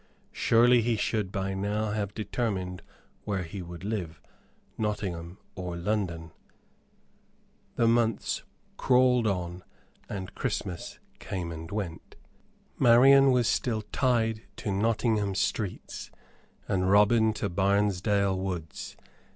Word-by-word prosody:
Surely 120 +1 +4
he 115 +1 +1
should 105 -2 -1
by 95 0 -2
now 105 +2 -1
have 105 -1 -3
determined 95 -5 -3 0.4
where 95 -3 -2
he 90 +3 -7
would 85 0 -9
live 95 -7 -4 0.6
Nottingham 95 -5 -3 0.2
or 90 -2 -5
London. 85 -4 -2 1.4
The 115 - +3
months 115 -1 +1 0.4
crawled 125 -2 +4
on 90 -2 -3 0.5
and 95 -2 -5
Christmas 90 -3 -4 0.2
came 90 -3 -4
and 80 0 -7
went. 100 -5 -5 0.6
Marian 135 +3 +7
was 125 -3 +3
still 110 -3 0
tied 115 -4 +1
to 105 - -4
Nottingham 105 -1 +1
streets 100 0 -3 0.6
and 95 -1 +1
Robin 110 +2 +5
to 105 - -2
Barnesdale 100 +1 +1
woods. 90 -4 -5
100 Hz, 110 wpm, -28 LUFS, 90-110 Hz, 1.4 s, Marian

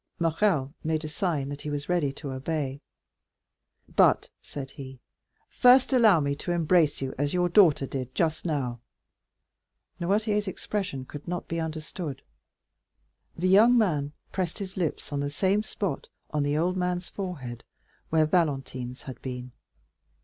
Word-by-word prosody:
Morrel 165 -4 +1
made 155 0 -1
a - - -2
sign 155 -4 -1
that 145 0 -6
he 150 - -5
was 145 0 -3
ready 175 -6 +1
to 140 0 -7
obey. 140 0 -3 1.1
"But," - - +4
said 135 -2 -7
he, 135 -2 -9 0.5
"first 255 +1 +5
allow 220 -9 +6
me 140 -1 0
to 175 - -3
embrace 165 -3 +3
you 135 -1 -3
as 145 +3 0
your 180 0 +3
daughter 170 -6 +5
did 130 -1 -5
just 160 -2 0
now." 135 -8 -2 1.2
Noirtier's 210 +3 +1
expression 185 -8 -3
could 145 +4 -9
not 175 0 -3
be 165 - -2
understood. 155 -2 -5 1.1
The 180 +2 0
young 225 +6 +7
man 150 -10 +1 0.2
pressed 180 -3 -2
his 195 -2 -6
lips 165 -4 -2
on 140 - 0
the 145 0 -1
same 190 +8 +1
spot, 205 -3 -3 0.2
on 150 - 0
the 145 +1 +1
old 175 +3 +1
man's 180 0 -1
forehead, 140 - -6 0.5
where 160 -1 +4
Valentine's 135 -6 -1
had 130 -4 -9
been. 125 -1 -6
155 Hz, 150 wpm, -27 LUFS, 140-180 Hz, 1.2 s, young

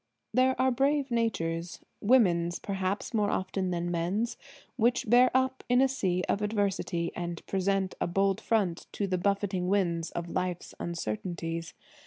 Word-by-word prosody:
There 260 +1 +3
are 260 0 +4
brave 275 +2 +1
natures–women's 175 -2 +1
perhaps, 195 +3 -3
more 210 -2 +2
often 190 0 -1
than 175 0 -2
men's–which 235 +7 -1
bear 245 +3 +6
up 260 0 +1
in 245 0 +5
a 270 - +5
sea 185 -9 0
of 200 - 0
adversity, 200 -5 -1
and 175 -1 -5
present 195 0 0
a - - +1
bold 195 +3 +1
front 200 -8 0
to 205 - -1
the 185 -2 -1
buffeting 195 -1 0
winds 175 -4 +1
of 170 0 -5
life's 180 0 -3
uncertainties. 165 - -4
195 Hz, 140 wpm, -29 LUFS, 175-230 Hz, -, bear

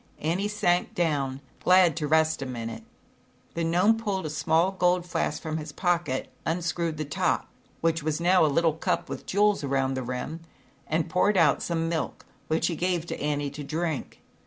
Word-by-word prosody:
Annie 175 +6 -1
sank 205 -4 +1
down 140 -6 0 0.2
glad 180 -3 +5
to 150 -2 -1
rest 160 0 +3
a 135 - -3
minute. 115 -2 -5 0.7
The 170 - -2
Gnome 180 +7 +3
pulled 200 -5 -2
a 155 - -3
small 160 +4 +2
gold 180 -2 +2
flask 175 - -1
from 155 -1 -3
his 155 -1 -6
pocket, 170 -5 -1
unscrewed 165 -1 -1
the 155 - -3
top, 140 - 0 0.3
which 165 0 +1
was 155 +1 -1
now 180 +1 +4
a - - +5
little 160 +2 +2
cup 160 - -1
with - - -6
jewels 205 -2 +2
around 135 -1 0
the 130 - -2
rim, 125 +6 -4 0.5
and 160 +1 0
poured 195 +2 +2
out 150 -5 +4
some 165 -1 -1
milk, 165 -1 -3 0.2
which 160 +1 +1
he 170 - 0
gave 175 -1 -1
Annie 145 -1 -2
to 150 - -7
drink. 155 +1 -3
165 Hz, 180 wpm, -27 LUFS, 150-175 Hz, 0.7 s, glad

